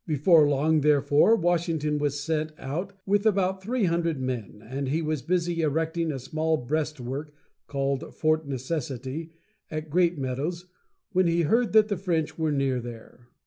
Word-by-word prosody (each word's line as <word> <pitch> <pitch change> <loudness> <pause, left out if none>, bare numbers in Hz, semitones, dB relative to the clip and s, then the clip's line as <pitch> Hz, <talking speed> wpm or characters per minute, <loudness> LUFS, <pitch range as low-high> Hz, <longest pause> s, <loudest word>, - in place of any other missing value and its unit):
Before 155 0 +5
long, 150 +2 +2
therefore, 145 +7 +4
Washington 165 -5 0
was 145 -1 -1
sent 155 +1 -2
out 175 +9 -4
with 200 +1 +2
about 190 -2 +1
three 235 +4 -1
hundred 170 -4 +1
men, 120 -5 -4
and 135 +2 -3
he 155 +4 +1
was 155 -3 -2
busy 170 +2 0
erecting 160 +2 0
a 140 - -3
small 155 +5 -1
breastwork 150 0 -3 0.4
(called 140 -1 -2
Fort 155 -1 +1
Necessity) 135 +2 -4 0.4
at 155 -1 -5
Great 175 0 +3
Meadows, 145 +7 -3 0.5
when 185 -2 +3
he 170 0 +2
heard 230 +9 +2
that 215 -1 +6
the 205 -3 -1
French 170 -5 -1
were 160 -2 0
near 135 -3 +1
there. 120 0 -11
155 Hz, 155 wpm, -26 LUFS, 140-170 Hz, 0.5 s, that